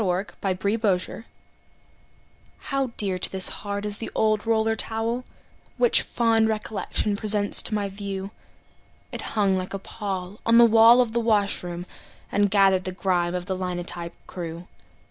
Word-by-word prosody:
THE 205 - 0
OLD 180 - +2 0.5
ROLLER 205 -2 +2
TOWEL 205 +5 -7 1.3
How 275 -2 -2
dear 190 -3 +1
to - - -1
this 190 -1 +4
heart 200 0 -5
is 205 -1 -1
the 225 - -5
old 215 0 +1
roller 225 0 +2
towel 225 +3 -3 0.5
Which 485 - +4
fond 225 -2 +1
recollection 215 -1 -2
presents 205 -1 +4
to 215 - 0
my 205 -1 -1
view. 195 0 -6 0.8
It - - -6 0.2
hung 195 -2 +2
like 185 +2 -5
a - - -2
pall 195 -1 -6
on 230 0 +4
the 235 - +8
wall 230 +2 +7
of 240 -3 -1
the 235 - 0
washroom, 200 -6 0 0.5
And 205 0 +2
gathered 195 -2 +3
the 185 - -3
grime 180 -2 -1
of 180 -1 -4
the 190 0 -2
linotype 175 -2 -4
crew. 170 0 -7
205 Hz, 160 wpm, -24 LUFS, 185-225 Hz, 1.3 s, the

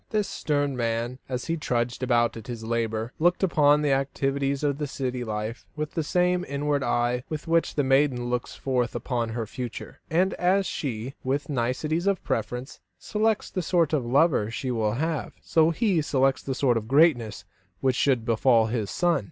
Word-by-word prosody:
This 210 -2 0
stern 145 -2 -1
man, 120 +1 -2
as 125 -1 -3
he 165 0 -1
trudged 120 -4 -1
about 120 -2 +2
at 110 -1 -9
his 120 -2 -6
labour, 115 0 -2
looked 175 +4 +2
upon 150 -4 +4
the 145 - +2
activities 135 +1 0
of 145 0 0
city 125 -2 -3
life 110 +1 -4
with 150 0 -3
that 165 - -1
same 180 +3 +1
inward 145 0 -1
eye 120 -1 0
with 155 0 -5
which 165 0 +1
the 145 - +2
maiden 135 -2 +2
looks 125 0 -3
forth 125 -3 -1
upon 120 -3 -2
her 115 0 -3
future; 120 +2 -7
and 180 +3 +2
as 190 +2 +3
she, 125 -5 -4
with 140 +4 -1
nicety 135 +5 0
of 195 -3 -1
preference, 125 +4 -3 0.2
selects 220 0 0
the 185 - -2
sort 165 -2 +1
of 145 -5 +2
lover 130 -2 +3
she 125 +2 -3
will 110 -3 0
have, 160 +5 -2
so 160 0 +3
he 185 -1 +1
selected 135 -2 +1
the 135 - -1
sort 125 -3 +2
of 110 -1 -4
greatness 130 -6 +3 0.3
which 130 +2 +1
should 130 -4 +2
befall 115 0 +4
his 110 -3 -2
son. 175 - +2
135 Hz, 180 wpm, -26 LUFS, 120-155 Hz, 0.3 s, upon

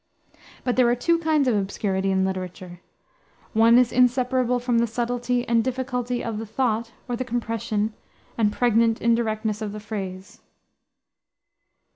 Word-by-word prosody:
But 250 -1 -1
there 250 -2 +5
are 240 - +3
two 335 +7 +1
kinds 310 -4 +2
of 240 - +3
obscurity 195 -1 -1
in 190 0 +2
literature. 185 -1 -5 0.7
One 230 +2 +6
is 250 -1 +4
inseparable 250 0 +2
from 245 -1 +1
the 235 - +2
subtlety 245 +1 -1
and 230 -1 +3
difficulty 250 -1 -2
of 225 -2 -3
the 225 - -5
thought 230 0 -1 0.2
or 245 - -2
the 250 - -2
compression 225 -3 -2 0.4
and 215 -3 +2
pregnant 230 -1 +2
indirectness 220 -2 0
of 210 -2 -4
the 215 - -6
phrase. 195 -3 -7
230 Hz, 145 wpm, -24 LUFS, 215-245 Hz, 0.7 s, One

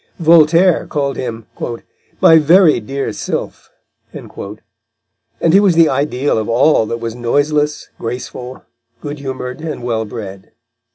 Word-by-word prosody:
Voltaire 170 +1 +4
called 140 -2 -2
him 115 -3 -5 0.8
"my 160 0 +7
very 165 0 +5
dear 135 +1 -4
Sylph," - - -5 0.4
and - - -10 1.2
he 195 - +7
was 195 -4 +3
the 165 -2 +5
ideal 135 -2 0
of 110 - -4
all 120 -1 +3
that 115 - -4
was 115 -1 -4
noiseless, 145 +5 -1
graceful, 125 +1 -7 0.4
good 145 0 -6
humoured, 130 0 -6
and 155 -6 -6
well 115 -2 -2
bred. 100 -3 -9
140 Hz, 125 wpm, -16 LUFS, 115-155 Hz, 1.2 s, my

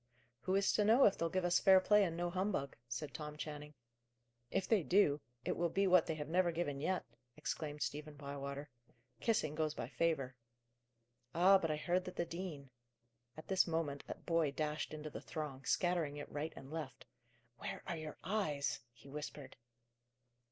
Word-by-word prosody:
"Who 185 +6 0
is 195 0 +3
to 210 - +3
know 230 +6 +6
if 200 - +5
they'll 165 - 0
give 185 +1 0
us 175 0 +4
fair 190 -1 +7
play 210 +2 +5
and 170 -3 -1
no 175 0 -1
humbug?' 185 -7 -1
said 130 +4 -4
Tom 150 +3 -6
Channing. 150 -1 -6 0.7
"If 195 +6 0
they 220 -4 +4
do, 155 -4 +4 0.2
it - - 0
will 170 0 +1
be 195 +4 +2
what 180 -3 +5
they 160 - -1
have 150 -1 -4
never 175 +2 +3
given 160 -4 -2
yet!" 185 +5 0 0.3
exclaimed 150 -1 -3
Stephen 150 +1 -4
Bywater. 140 0 -5 0.5
"Kissing 195 -10 +1
goes 155 0 -1
by - - -4
favour." 140 -6 0 1.0
"Ah, 190 +3 +7
but 165 - -1
I 155 - +1
heard 180 +4 +1
that 185 - -6
the 170 - 0
dean 165 -6 -6 0.3
" 120 +2 -40
At 155 - -9
this 190 -1 +3
moment 160 -4 -1
a - - -4
boy 165 -3 +1
dashed 150 +1 -2
into 155 0 -6
the - - -6
throng, 140 -4 -5
scattering 170 -4 +1
it 145 - -7
right 150 +2 -3
and 135 +1 -10
left. 150 -6 -5 0.5
"Where - - -5
are 170 - -2
your 155 -1 -6
eyes?" 155 -9 0
he 120 +3 -17
whispered. 145 -1 -7
155 Hz, 185 wpm, -37 LUFS, 145-180 Hz, 1.0 s, fair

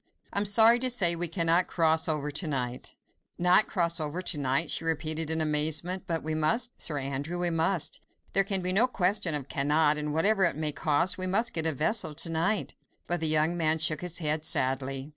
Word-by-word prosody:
I - - +1
am 205 - -2
sorry 225 +4 +5
to 255 +1 0
say 180 -9 +3
we 175 +1 +1
cannot 165 +1 +1
cross 160 -1 +1
over 150 -1 -2
to 155 +3 -2
night." 125 -4 -4 0.4
"Not 180 +4 +4
cross 170 -3 -1
over 155 +3 -4
to 160 -4 +1
night?" 140 +4 +1
she - - +1
repeated 160 -1 -1
in 160 0 0
amazement. 155 +4 0
"But 165 -1 -3
we 155 +1 -4
must, 155 +11 -1
Sir 150 - -1
Andrew, 140 +5 -4
we 175 -1 -1
must! 165 +1 -1 0.3
There 195 - +4
can 195 -1 -1
be 180 0 0
no 225 +6 +3
question 185 -7 0
of 140 -2 -5
cannot, 150 +2 +1
and 150 0 -4
whatever 195 +6 +1
it 170 -6 +1
may 155 0 -1
cost, 155 +6 0
we 185 - -3
must 220 +5 +1
get 160 -1 0
a - - +1
vessel 160 - 0
to 165 +2 -1
night." 170 +6 -1 0.3
But 175 0 -2
the 160 - -1
young 155 +2 +1
man 160 -2 +1
shook 160 -1 0
his 180 -1 -3
head 155 -2 -1
sadly. 135 0 -1
160 Hz, 215 wpm, -27 LUFS, 150-180 Hz, 0.4 s, sorry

